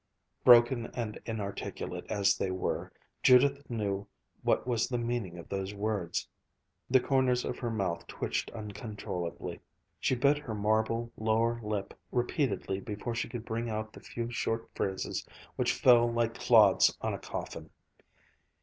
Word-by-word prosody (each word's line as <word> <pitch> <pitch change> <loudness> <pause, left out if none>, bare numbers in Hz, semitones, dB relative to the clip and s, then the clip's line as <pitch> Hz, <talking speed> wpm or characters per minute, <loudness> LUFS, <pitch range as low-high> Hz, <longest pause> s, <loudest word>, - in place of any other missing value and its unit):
Broken 120 -1 +7
and 115 -3 -3
inarticulate 105 -3 -4
as 100 -2 +3
they 95 - -1
were, 95 0 -2 0.3
Judith 140 +3 +5
knew 100 -4 -2 0.3
what - - +2
was 120 -2 +1
the 125 - -1
meaning 120 -7 -2
of 85 - -9
those 100 +1 -3
words. 100 -4 -2 0.6
The 130 +1 +6
corners 130 -1 +2
of - - -4
her 120 - -2
mouth 95 -6 -2
twitched - - -2
uncontrollably. 105 -5 -5 0.4
She 130 - +1
bit 140 +4 +3
her 120 -7 -5
marble 110 +3 +1
lower 115 +2 +1
lip 105 -2 -3 0.2
repeatedly 120 -5 0
before 105 +3 -4
she 115 - -2
could 120 -1 -6
bring 115 +1 -2
out 110 0 -4
the - - -11
few 120 0 -5
short 115 -1 -1
phrases 95 -1 -2 0.3
which - - +2
fell 120 -2 +5
like 115 -1 +1
clods - - +5
on - - -1
a - - -4
coffin. - - -6
115 Hz, 145 wpm, -31 LUFS, 105-120 Hz, 0.6 s, Broken